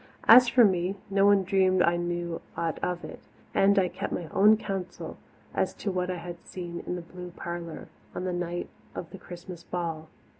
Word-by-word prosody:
As 245 +1 +9
for 245 0 +6
me, 185 -1 +1 0.2
no 195 0 +4
one 200 -1 +5
dreamed 185 0 +3
I 170 - +3
knew 175 -1 -2 0.2
aught 165 -1 -1
of 180 -1 -1
it, - - -9 0.3
and 200 +1 +4
I 190 -2 +4
kept - - -5
my 170 -3 -3
own 210 +3 +6
counsel 195 -4 -5 0.4
as - - 0
to 200 - -3
what 180 0 -1
I 180 - -2
had 175 0 -8
seen 175 -2 -6
in 180 - -1
the 175 - -5
blue 180 +1 -9
parlour 170 -1 -6 0.3
on - - -3
the 185 -1 -1
night 175 0 -3 0.3
of 170 - -6
the 195 - -9
Christmas 175 -1 -9
ball. 165 -3 -4
180 Hz, 195 wpm, -28 LUFS, 175-195 Hz, 0.4 s, As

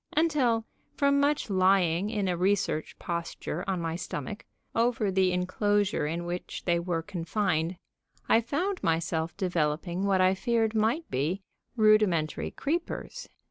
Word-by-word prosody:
until, 265 -9 +2 0.3
from 280 0 +3
much 290 +1 +1
lying 185 -1 +3
in 210 -3 -1
a 180 - +1
research 185 -3 0
posture 170 -1 -4
on 190 -2 0
my 165 -1 -2
stomach, 175 +4 -5 0.3
over 230 -3 +1
the 185 -1 +3
inclosure 200 -1 +1
in 170 +3 -3
which 175 +1 -5
they 170 -1 +2
were 170 -1 -2
confined, 170 -1 -1 0.5
I 230 - +5
found 355 - -2
myself 165 0 -1
developing 175 0 -1
what 195 -1 +3
I 185 0 +5
feared 225 +2 +1
might 225 +9 +1
be 160 +9 -1 0.3
rudimentary 215 -8 +3
creepers. 340 - -4
190 Hz, 135 wpm, -28 LUFS, 170-225 Hz, 0.5 s, I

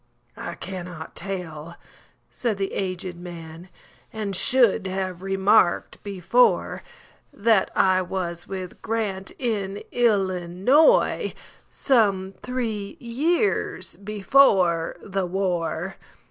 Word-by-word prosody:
"I - - -6
cannot 180 -3 -7
tell," 170 -3 -6 0.6
said 230 -5 -2
the 195 0 -2
aged 185 -1 -3
man,"And 175 +4 -9
should 235 -3 +3
have 185 -1 -3
remarked 195 0 +2
before, 205 - +2 0.5
That 215 -1 +2
I 185 -1 +4
was 175 -2 -4
with 185 -2 -7
Grant,—in 205 -1 -3
Illinois,—Some 200 - +2
three 230 -1 -3
years 305 - 0
before 195 -5 +3
the 195 -2 -2
war." 180 -1 -2
195 Hz, 80 wpm, -24 LUFS, 180-220 Hz, 0.6 s, I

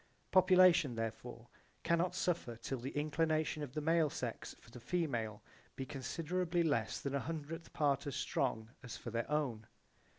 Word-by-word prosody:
Population 185 -7 +6
therefore 115 +1 -5 0.4
cannot 170 +2 +2
suffer 165 -9 -1
till 130 +3 -4
the 125 +3 -4
inclination 155 +1 +1
of 140 -4 -5
the 155 - -1
male 160 0 +3
sex 120 -4 -5
for 115 - -18
the 125 - -9
female 120 -9 -2 0.3
be 135 - -4
considerably 165 +6 -1
less 115 -9 0
than 140 - -3
a 140 - +1
hundredth 165 +2 -5
part 145 -2 +1
as 140 - -3
strong 115 -4 -1
as 125 - -7
for 120 - -7
their 115 0 -2
own. 130 -8 -1
145 Hz, 160 wpm, -36 LUFS, 120-165 Hz, 0.4 s, Population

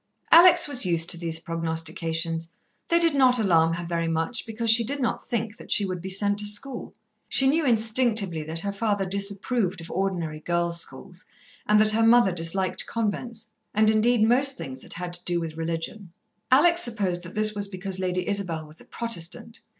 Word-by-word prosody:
Alex 350 0 +7
was 280 -3 +2
used 170 -3 0
to 175 - -1
these 165 -2 -3
prognostications. 165 0 -3 0.4
They 335 - +2
did 335 -2 +3
not 260 -3 +4
alarm 165 -7 +2
her 170 0 -6
very 170 -1 -2
much, 165 +10 -2
because 225 0 +1
she 230 +1 +7
did 280 +5 -3
not 245 - -3
think 225 -2 -3
that - - -12
she 205 - +3
would 185 -2 -5
be 190 - -6
sent 205 +2 +1
to 210 - -2
school. 240 +5 -4 0.3
She 270 - +3
knew 295 +2 +2
instinctively 220 -6 +2
that 160 +1 -3
her 200 - -3
father 205 -1 -2
disapproved 200 +1 -1
of 165 - -10
ordinary 175 -5 -3
girls' 170 +1 -1
schools, 175 +7 -8 0.4
and 210 0 +4
that 215 0 +5
her 220 +1 0
mother 230 -3 +4
disliked 180 +2 -1
convents, 230 0 -4 0.2
and 215 0 +3
indeed 220 +1 +2
most 265 +3 +4
things 130 -1 -8
that - - -6
had 175 0 -6
to 175 0 -4
do 175 -1 0
with 165 -2 -6
religion. 165 +4 -5 0.4
Alex 340 +6 +5
supposed 200 - -1
that 175 0 -12
this 215 0 +5
was 205 -1 0
because 190 -1 -5
Lady 180 -1 -2
Isabel 180 -6 -3
was 155 +1 -13
a - - -17
Protestant! 230 +1 -5
200 Hz, 190 wpm, -24 LUFS, 170-230 Hz, 0.4 s, Alex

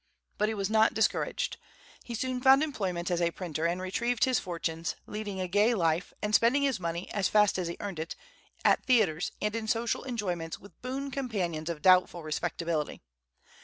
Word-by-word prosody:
But 210 +1 +2
he 220 - -2
was 195 -2 -1
not 220 +1 +3
discouraged. 220 -1 0 0.5
He 235 - -6
soon 255 +2 -2
found 270 +3 +6
employment 185 - -2
as 175 0 +1
a 170 - +3
printer 170 -2 -2
and 175 +2 -1
retrieved 230 +6 0
his 255 -3 +3
fortunes, 165 -2 -3
leading 210 -2 -5
a 185 - -1
gay 205 +6 +3
life, 170 -2 +1
and 210 0 -1
spending 240 +6 +4
his 270 -7 +1
money, 170 0 -3
as 195 -2 +1
fast 210 -2 +3
as 180 - -2
he 170 - -5
earned 195 -5 -5
it, 160 +2 -4 0.5
at - - +4
theatres 200 -10 +2
and 210 +1 0
in 225 -1 -3
social 230 +1 0
enjoyments 180 -10 -3
with 200 - -17
boon 270 +2 -4
companions 185 - -2
of 165 -3 -5
doubtful 185 -2 +5
respectability. 160 - -2
195 Hz, 185 wpm, -29 LUFS, 170-230 Hz, 0.5 s, found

